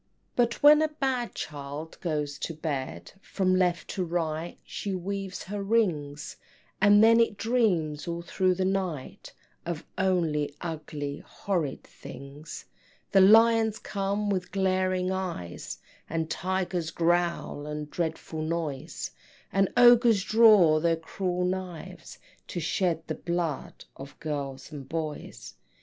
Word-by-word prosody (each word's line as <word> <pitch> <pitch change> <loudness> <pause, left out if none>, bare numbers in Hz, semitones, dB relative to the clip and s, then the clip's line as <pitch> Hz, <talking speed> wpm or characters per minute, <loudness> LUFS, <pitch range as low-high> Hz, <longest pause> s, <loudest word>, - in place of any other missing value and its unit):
But 240 +1 +1
when 300 +1 +8
a 315 - +3
bad 265 -5 -2
child 145 +2 -6
goes 150 -4 -2
to 165 - -4
bed, 135 - -4
From 185 -2 0
left 180 -3 +1
to 190 - -2
right 165 -1 -2
she 200 -2 -4
weaves 195 +1 -4
her 205 +2 -5
rings, 165 -10 0 0.4
And 205 +1 +7
then 230 +1 +7
it 230 -3 +2
dreams 180 -12 +1
all 170 0 -3
through 185 +1 +1
the 185 +1 0
night 185 -8 -3 0.3
Of 170 -3 -5
only 165 -6 +1
ugly 150 -3 -5
horrid 170 -9 -3
things! 145 +3 -10 0.5
Then 195 0 +7
lions 225 -1 +5
come 200 +1 -2
with 180 -2 -2
glaring 185 -1 +1
eyes, 180 - -4 0.3
And 160 0 -2
tigers 180 -2 -1
growl, 170 -3 0
a 150 0 -4
dreadful 160 0 -4
noise, 155 -4 -3 0.4
And 195 0 +3
ogres 240 -4 +7
draw 210 -9 +6
their 165 +1 +2
cruel 180 +2 -2
knives, 180 -2 -5 0.3
To 175 - -4
shed 165 0 0
the - - -3
blood 170 -4 -3
of 135 +1 -11
girls 145 -3 -5
and 140 -3 -8
boys. 160 -2 -5
175 Hz, 130 wpm, -28 LUFS, 155-195 Hz, 0.5 s, when